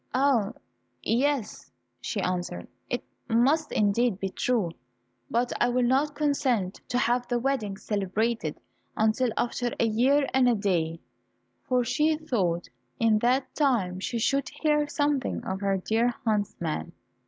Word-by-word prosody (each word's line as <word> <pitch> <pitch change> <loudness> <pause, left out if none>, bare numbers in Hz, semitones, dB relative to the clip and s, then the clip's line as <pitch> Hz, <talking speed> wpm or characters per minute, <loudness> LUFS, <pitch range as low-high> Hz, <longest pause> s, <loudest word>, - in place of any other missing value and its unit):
"Ah, 255 -6 +2 0.5
yes," 255 -1 0 0.3
she 215 - -3
answered, 175 - -3 0.2
"it 245 - -2 0.3
must 275 +7 +3
indeed 210 0 +2
be 195 - -2
true, 215 -4 0 0.6
but 240 +1 0
I 240 - +4
will 250 +1 +2
not 275 +4 +2
consent 270 -10 0
to 245 - -1
have 245 -1 +1
the 245 - 0
wedding 235 -6 -1
celebrated 210 +3 -1 0.4
until 220 +3 +2
after 240 0 -1
a - - +4
year 260 +6 +3
and 255 -1 +5
a 240 - +3
day," 170 -5 0 0.6
for 250 -1 +1
she 305 +6 +2
thought 195 - -1 0.3
in 220 -2 +4
that 255 +4 +1
time 225 -11 +1
she 235 +5 -3
should 275 +4 +1
hear 300 -1 +1
something 290 -4 0
of 190 -3 -3
her 195 -1 +1
dear 225 +5 +1
huntsman. 195 -7 -1
240 Hz, 140 wpm, -27 LUFS, 205-265 Hz, 0.6 s, and